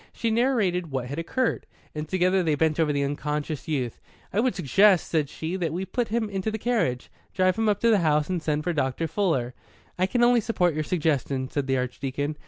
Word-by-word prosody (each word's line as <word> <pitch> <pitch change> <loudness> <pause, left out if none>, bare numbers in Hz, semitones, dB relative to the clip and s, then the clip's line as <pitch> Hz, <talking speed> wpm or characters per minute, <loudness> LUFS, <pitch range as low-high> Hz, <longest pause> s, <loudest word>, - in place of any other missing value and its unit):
She 230 - -1
narrated 220 -8 +1
what 130 -3 -3
had 140 +5 -5
occurred, 235 +9 -1 0.3
and 150 0 -5
together 185 0 +2
they 160 -4 +1
bent 160 +1 +1
over 155 -2 +3
the 140 -1 0
unconscious 150 0 -3
youth. 130 -7 -2 0.3
"I 200 - +1
would 255 +2 +1
suggest," 190 +3 +4
said 155 -4 0
she, 160 +3 -4
"that 170 -4 -1
we 185 +3 -2
put 235 +5 -2
him 225 0 -1
into 195 0 -2
the 220 - -3
carriage, 210 - -1 0.2
drive 185 -1 +3
him 225 -1 +1
up 205 -1 +1
to 230 - +4
the 210 - +4
house, 150 -3 +2
and 180 -2 -2
send 150 -1 -1
for 175 +1 -1
Dr. 145 +2 -1
Fuller." 160 -9 0 0.5
"I 185 - +3
can 240 +4 +1
only 240 -1 +5
support 180 -6 +1
your 155 +1 -1
suggestion," 145 -5 -1
said 140 -1 -2
the 135 0 +1
Archdeacon. 135 +3 -3
165 Hz, 215 wpm, -25 LUFS, 145-205 Hz, 0.5 s, only